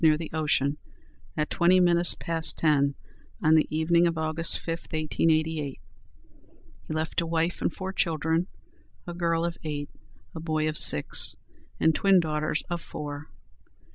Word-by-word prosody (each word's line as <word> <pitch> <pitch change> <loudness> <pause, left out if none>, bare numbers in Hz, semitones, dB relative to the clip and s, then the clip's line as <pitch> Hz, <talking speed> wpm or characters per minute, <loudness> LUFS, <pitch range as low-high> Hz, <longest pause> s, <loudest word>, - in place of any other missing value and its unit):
near 155 -1 +5
the 160 -1 -7
ocean, 145 -2 0 0.6
at 150 0 0
twenty 180 +2 +4
minutes 175 -1 +4
past 165 -1 -3
ten 140 -3 +2 0.5
on 155 0 +4
the 155 -1 +4
evening 170 +2 +2
of 165 -1 -2
August 160 +1 +2
5, - - -8 0.2
1888. 155 -2 -1 1.1
He - - -7
left 160 +2 -1
a - - -3
wife 165 +1 -1
and - - 0
four 190 +2 -6
children, 165 -1 0 0.6
a 175 - -6
girl 170 -1 0
of 170 0 -4
eight, 145 -2 -5 0.4
a 160 - -6
boy 155 -1 -1
of 155 - -2
six, 75 - +4 0.4
and 160 - +3
twin 195 +2 +4
daughters 155 -1 -1
of 175 -1 -4
four. 145 0 -7
160 Hz, 150 wpm, -26 LUFS, 155-170 Hz, 1.1 s, near